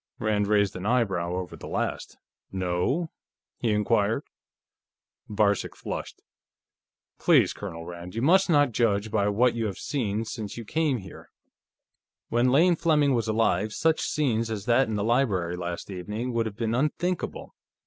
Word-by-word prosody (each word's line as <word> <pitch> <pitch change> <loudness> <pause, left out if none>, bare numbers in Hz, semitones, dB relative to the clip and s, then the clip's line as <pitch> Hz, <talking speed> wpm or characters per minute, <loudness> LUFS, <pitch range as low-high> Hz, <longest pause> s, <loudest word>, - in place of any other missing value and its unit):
Rand 105 -2 0
raised 100 -2 +2
an 95 +2 -4
eyebrow 95 -8 +1
over 90 -1 -5
that - - -10
last. - - -3 0.3
"No?" 95 - -1 0.5
he 120 - 0
inquired. 105 -1 +1 1.1
Varcek 105 -1 +1
flushed. - - -6 1.0
"Please, - - +4
Colonel 85 0 -7
Rand, 85 +2 -8
you 115 - -2
must 190 +6 +4
not 145 -5 +4
judge 110 -2 +1
by 100 -1 +1
what 120 +4 +3
you 115 -2 -1
have 100 - -5
seen 115 -5 -2
since 110 -2 -6
you 115 - -6
came 155 0 0
here. 95 -4 -11 1.0
When 120 +2 +2
Lane 170 +7 +5
Fleming 150 -4 +2
was 115 -2 0
alive, 110 -1 +1
such 160 +5 +1
scenes 115 -7 0
as 105 -3 -4
that 120 +2 +3
in 110 - -2
the 105 - -1
library 100 -8 +1
last 90 +2 -5
evening 105 +7 -4
would 115 -1 0
have 105 -1 -8
been 115 -1 -1
unthinkable. 155 +7 -2
110 Hz, 155 wpm, -26 LUFS, 100-125 Hz, 1.1 s, Lane